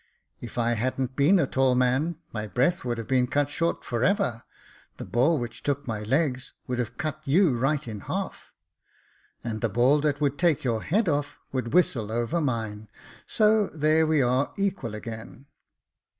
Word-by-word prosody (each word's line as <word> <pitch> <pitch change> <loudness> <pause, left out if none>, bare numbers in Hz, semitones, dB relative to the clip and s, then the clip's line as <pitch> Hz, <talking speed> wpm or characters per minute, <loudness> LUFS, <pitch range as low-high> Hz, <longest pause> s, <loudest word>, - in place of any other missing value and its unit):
If 120 0 -9
I 120 0 +2
hadn't 130 +2 -1
been 150 +8 +5
a 165 - +3
tall 130 -1 +2
man, 130 +7 +1 0.2
my 110 -1 -3
breath 135 - +1
would 120 -2 -2
have 115 - -6
been 130 -1 +2
cut 145 +2 0
short 165 +3 -1
for 120 -1 -1
ever; 130 - +1 0.6
the - - -6
ball 140 +8 +2
which 120 -3 -5
took 145 0 -2
my 110 -3 -3
legs, 130 +3 0
would 125 -1 -3
have 120 -3 -3
cut 155 -2 -3
you 155 0 +3
right 135 +3 0
in 110 -2 -5
half." - - -5 0.5
*' - - -36
And 110 -2 -4
the 115 - +1
ball 125 +7 +3
that 145 -1 0
would 145 -1 0
take 170 -5 +2
your 115 -4 0
head 205 - +1
off, 145 -2 -1
would 130 -3 -3
whistle 120 -12 +2
over 120 +9 0
mine; 110 -6 -3 0.4
so 215 -1 +3
there 155 +1 +2
we 155 -3 +3
are 130 +3 +1
equal 190 - -2
again." 110 +4 -8
130 Hz, 180 wpm, -26 LUFS, 120-155 Hz, 0.6 s, been